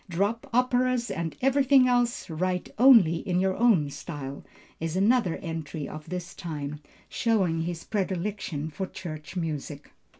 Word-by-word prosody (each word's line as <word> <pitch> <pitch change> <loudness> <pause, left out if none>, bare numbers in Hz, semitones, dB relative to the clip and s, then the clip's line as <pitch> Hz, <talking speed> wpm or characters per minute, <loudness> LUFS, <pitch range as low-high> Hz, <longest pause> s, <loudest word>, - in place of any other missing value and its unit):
"Drop 205 +10 -1
operas 250 -1 +2
and 165 -2 -3
everything 270 -1 +5
else, 245 -1 +1
write 180 +2 -2
only 230 -11 +7
in 180 0 -1
your 190 0 +1
own 195 -12 +3
style," 140 -3 -7 0.4
is 165 +1 -3
another 200 -2 +3
entry 160 -3 -5
of 155 +1 -9
this 180 +1 -5
time, 150 -3 -5 0.3
showing 190 -8 +1
his 170 0 -4
predilection 190 -6 -3
for 190 +5 -4
church 155 -3 -8
music. 150 -4 -4
180 Hz, 135 wpm, -27 LUFS, 160-230 Hz, 0.4 s, only